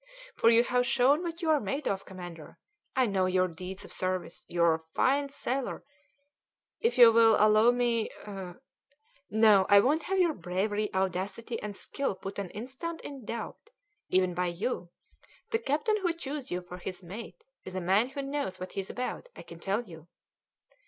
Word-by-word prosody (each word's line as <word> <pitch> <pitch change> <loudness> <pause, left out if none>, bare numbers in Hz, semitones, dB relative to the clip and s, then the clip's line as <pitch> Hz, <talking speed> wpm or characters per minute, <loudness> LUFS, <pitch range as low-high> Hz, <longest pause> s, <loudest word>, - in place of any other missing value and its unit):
"For 230 - +4
you 230 0 +6
have 245 0 +1
shown 270 +5 +4
what 340 0 -5
you 320 - +3
are 305 - +4
made 275 +7 -3
of, 195 0 -2
commander; 175 -4 -10 0.4
I 260 -1 +4
know 195 -4 +1
your 185 0 +2
deeds 185 +3 -8
of - - -11
service. 185 -1 -3
You 170 -1 +1
are 170 -1 +5
a 160 0 -4
fine 280 +1 +2
sailor!" 270 -1 -3 1.0
"If 460 - +1
you 240 -2 +10
will 225 -1 +6
allow 215 +2 +5
me 240 -2 +1 0.6
" 285 0 -39
"No, 215 -3 +5
I 205 - +8
won't 290 +9 +3
have 385 - +1
your 350 -4 +3
bravery, 200 - -2
audacity, 190 +5 -2
and 210 -1 -5
skill 275 +1 -3
put 195 +1 -7
an 195 -3 -4
instant 265 - -6
in 275 -5 -8
doubt, 235 - -6 0.4
even 185 -1 +2
by 180 +1 0
you! 180 +1 -3 0.6
The 450 - +2
captain 430 - +1
who 370 -4 0
chose 285 -4 -6
you 180 0 -3
for 180 +1 -9
his 185 +1 -6
mate 225 - -9 0.2
is 185 - -8
a - - 0
man 195 +7 +2
who 275 +1 -5
knows 275 -9 -3
what 185 0 -6
he's 195 -1 -4
about, 250 - -4
I - - -10
can 170 - -12
tell 200 +6 -1
you." 165 -6 -13
220 Hz, 185 wpm, -29 LUFS, 185-275 Hz, 1.0 s, you